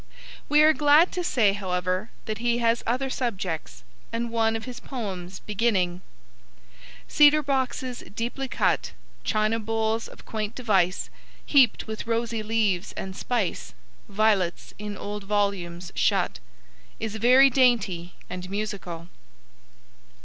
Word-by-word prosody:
We 300 Hz, +1 st, +6 dB
are 310 Hz, +1 st, +7 dB
glad 300 Hz, +3 st, +5 dB
to 360 Hz, -, -3 dB
say, 225 Hz, -, +3 dB
however, 185 Hz, +1 st, -2 dB, 0.2 s
that 215 Hz, -1 st, -4 dB
he 240 Hz, 0 st, +1 dB
has 235 Hz, 0 st, +2 dB
other 260 Hz, +3 st, 0 dB
subjects, 180 Hz, -, -3 dB, 0.3 s
and 235 Hz, 0 st, -2 dB
one 225 Hz, -1 st, +2 dB
of 225 Hz, -, -4 dB
his 250 Hz, -1 st, -7 dB
poems 190 Hz, -8 st, -6 dB
beginning: 195 Hz, -5 st, 0 dB, 1.1 s
Cedar 300 Hz, 0 st, +6 dB
boxes 260 Hz, -2 st, -1 dB, 0.2 s
deeply 245 Hz, +4 st, -3 dB
cut, -, -, 0 dB, 0.3 s
China 215 Hz, +1 st, +1 dB
bowls 225 Hz, +1 st, -1 dB
of -, -, -15 dB
quaint 215 Hz, -1 st, -4 dB
device, 195 Hz, -7 st, +1 dB, 0.3 s
Heap'd 265 Hz, -6 st, +4 dB
with 220 Hz, 0 st, -6 dB
rosy 230 Hz, -1 st, -1 dB
leaves 215 Hz, -4 st, 0 dB
and 190 Hz, -1 st, -6 dB
spice, 225 Hz, -, -2 dB, 0.3 s
Violets 200 Hz, -4 st, +1 dB
in 210 Hz, -1 st, -5 dB
old 205 Hz, 0 st, -6 dB
volumes 190 Hz, -4 st, -1 dB
shut 65 Hz, -, +1 dB, 0.6 s
is 220 Hz, -1 st, -3 dB
very 255 Hz, +5 st, +6 dB
dainty 210 Hz, -9 st, +2 dB
and 180 Hz, 0 st, -6 dB
musical. 195 Hz, -5 st, -4 dB
220 Hz, 125 wpm, -26 LUFS, 190-240 Hz, 1.1 s, are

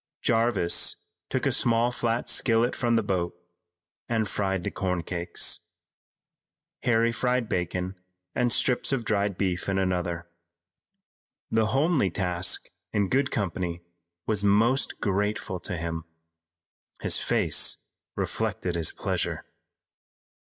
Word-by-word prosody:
Jarvis 115 Hz, -6 st, +3 dB, 0.3 s
took -, -, -1 dB
a -, -, +3 dB
small 120 Hz, +1 st, +3 dB
flat 120 Hz, -1 st, -1 dB
skillet 115 Hz, +1 st, +2 dB
from 120 Hz, -2 st, +1 dB
the 115 Hz, -, +2 dB
boat 90 Hz, -3 st, -1 dB, 0.7 s
and 110 Hz, -2 st, +1 dB
fried 95 Hz, -3 st, -1 dB
the -, -, -2 dB
corn 90 Hz, -3 st, -1 dB
cakes. 85 Hz, 0 st, 0 dB, 1.2 s
Harry 115 Hz, -1 st, +3 dB
fried 125 Hz, 0 st, 0 dB
bacon 90 Hz, -2 st, -2 dB, 0.4 s
and 120 Hz, -1 st, +1 dB
strips 125 Hz, +2 st, +2 dB
of 125 Hz, -4 st, 0 dB
dried 100 Hz, -3 st, 0 dB
beef 95 Hz, -1 st, -1 dB
in 95 Hz, -, +1 dB
another. 90 Hz, -2 st, -1 dB, 1.2 s
The 110 Hz, -1 st, +3 dB
homely 135 Hz, -, +2 dB
task 90 Hz, 0 st, -1 dB, 0.2 s
in 100 Hz, -3 st, +1 dB
good 135 Hz, 0 st, +2 dB
company 90 Hz, -3 st, -2 dB, 0.4 s
was 105 Hz, -2 st, 0 dB
most 115 Hz, +7 st, +3 dB
grateful 100 Hz, -2 st, -1 dB
to 90 Hz, +1 st, -4 dB
him. 80 Hz, -1 st, -4 dB, 1.0 s
His -, -, +2 dB
face -, -, +2 dB, 0.4 s
reflected 90 Hz, -, -2 dB
his 85 Hz, -2 st, +2 dB
pleasure. -, -, -2 dB
100 Hz, 115 wpm, -27 LUFS, 90-115 Hz, 1.2 s, Jarvis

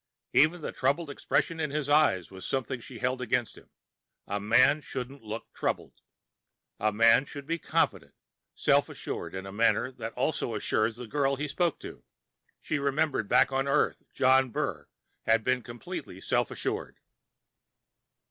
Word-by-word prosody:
Even 155 Hz, +4 st, +4 dB
the -, -, -4 dB
troubled 145 Hz, +4 st, 0 dB
expression 165 Hz, +3 st, -1 dB
in 155 Hz, -1 st, 0 dB
his 145 Hz, 0 st, -2 dB
eyes 145 Hz, -, +3 dB
was 95 Hz, -1 st, -10 dB
something 130 Hz, -1 st, -2 dB
she 120 Hz, +1 st, -11 dB
held 125 Hz, +2 st, -1 dB
against 125 Hz, -2 st, 0 dB
him. -, -, -17 dB, 0.6 s
A 100 Hz, +1 st, -2 dB
man 130 Hz, +8 st, +4 dB
shouldn't 135 Hz, 0 st, -6 dB
look 110 Hz, +1 st, -7 dB
troubled. -, -, -3 dB, 0.8 s
A 110 Hz, +1 st, +2 dB
man 115 Hz, +4 st, +5 dB
should 140 Hz, -1 st, -9 dB
be 165 Hz, +3 st, -2 dB
confident, -, -, 0 dB, 0.4 s
self -, -, +3 dB
assured 85 Hz, +2 st, -6 dB
in 95 Hz, 0 st, -5 dB
a 95 Hz, -, -7 dB
manner 115 Hz, +4 st, +2 dB
that 115 Hz, -3 st, -6 dB
also 125 Hz, -3 st, -1 dB
assured 110 Hz, +1 st, +1 dB
the 125 Hz, +1 st, -7 dB
girl 140 Hz, +3 st, +1 dB
he 150 Hz, +2 st, -3 dB
spoke 165 Hz, +3 st, 0 dB
to. -, -, -9 dB, 0.6 s
She 150 Hz, -, -1 dB
remembered 140 Hz, -3 st, 0 dB
that -, -, +1 dB
back -, -, +5 dB
on 135 Hz, +1 st, 0 dB
Earth 140 Hz, +2 st, +1 dB
John 130 Hz, 0 st, +4 dB
Burr -, -, -3 dB, 0.4 s
had 115 Hz, 0 st, +4 dB
been 130 Hz, +1 st, +1 dB
completely 120 Hz, 0 st, -7 dB
self -, -, 0 dB
assured. -, -, -4 dB
130 Hz, 160 wpm, -29 LUFS, 115-140 Hz, 0.8 s, man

